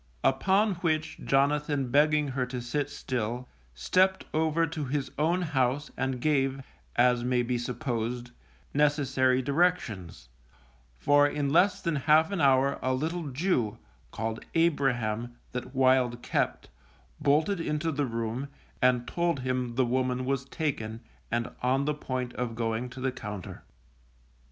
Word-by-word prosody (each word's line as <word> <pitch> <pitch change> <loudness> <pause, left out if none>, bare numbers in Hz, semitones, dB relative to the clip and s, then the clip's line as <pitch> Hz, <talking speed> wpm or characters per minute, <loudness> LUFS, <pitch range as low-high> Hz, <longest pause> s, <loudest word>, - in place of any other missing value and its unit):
Upon 200 +2 +3
which 155 -2 -1
Jonathan 140 -1 +1
begging 150 +1 +3
her 130 -1 -1
to 125 0 -4
sit 140 +4 -2
still, 125 -2 -3 0.3
stepped 185 - +2
over 160 +1 +2
to 155 -2 -4
his 135 -1 -2
own 170 +4 +2
house 140 -2 0
and 130 -1 -2
gave, 135 -1 +1 0.3
as 125 0 +3
may 125 0 +1
be 120 0 -1
supposed, 120 -1 -3 0.4
necessary 135 -3 +2
directions, 135 - 0 0.7
for 145 - +4
in 145 -1 -1
less 185 +5 +3
than 165 -3 0
half 155 +4 +4
an 195 -4 -1
hour 135 0 +3
a 130 0 +1
little 160 +3 -2
Jew 125 - 0 0.3
(called 110 0 -4
Abraham) 120 -8 +1 0.2
that 125 +2 -6
Wild 130 -2 +3
kept, - - -1 0.5
bolted 155 +6 +2
into 160 0 -1
the 145 -2 -1
room, 115 +3 -3 0.3
and 125 -1 +3
told 170 -4 0
him 125 -2 -2
the 130 0 +3
woman 130 +1 0
was 135 0 -1
taken, 115 -8 -3 0.3
and 120 0 0
on 130 +3 +1
the 150 - +1
point 130 -4 -4
of 120 -2 -3
going 115 +1 -2
to 130 - -10
the 130 0 0
Compter. 105 -7 -7
135 Hz, 140 wpm, -28 LUFS, 125-150 Hz, 0.7 s, for